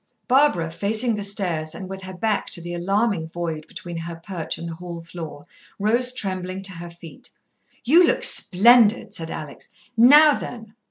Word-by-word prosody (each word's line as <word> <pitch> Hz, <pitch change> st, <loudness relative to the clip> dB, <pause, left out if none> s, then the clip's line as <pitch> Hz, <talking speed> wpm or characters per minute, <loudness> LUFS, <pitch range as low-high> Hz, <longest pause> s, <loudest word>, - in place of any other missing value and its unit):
Barbara, 255 Hz, -, +2 dB
facing 215 Hz, +7 st, 0 dB
the 210 Hz, -, -4 dB
stairs, 175 Hz, -6 st, -3 dB
and 190 Hz, -, -8 dB
with 190 Hz, 0 st, -8 dB
her 190 Hz, 0 st, -9 dB
back 215 Hz, +2 st, -2 dB
to 170 Hz, -, -6 dB
the 175 Hz, +1 st, -7 dB
alarming 195 Hz, 0 st, -1 dB
void 165 Hz, -2 st, -5 dB
between 175 Hz, 0 st, -8 dB
her 165 Hz, 0 st, -6 dB
perch 165 Hz, 0 st, -5 dB
and 170 Hz, -, -7 dB
the 165 Hz, -, -6 dB
hall 170 Hz, 0 st, -8 dB
floor, 165 Hz, -3 st, -10 dB, 0.3 s
rose 235 Hz, +5 st, +2 dB
trembling 185 Hz, -4 st, -4 dB
to 195 Hz, -, -1 dB
her 170 Hz, 0 st, -9 dB
feet. 170 Hz, -1 st, -13 dB, 0.5 s
"You 335 Hz, +8 st, +5 dB
look -, -, 0 dB
splendid," 230 Hz, +4 st, +5 dB
said 165 Hz, -1 st, -6 dB
Alex. 150 Hz, -3 st, -9 dB, 0.3 s
"Now 290 Hz, +6 st, +7 dB
then!" 225 Hz, -5 st, -8 dB
185 Hz, 170 wpm, -22 LUFS, 170-225 Hz, 0.5 s, Now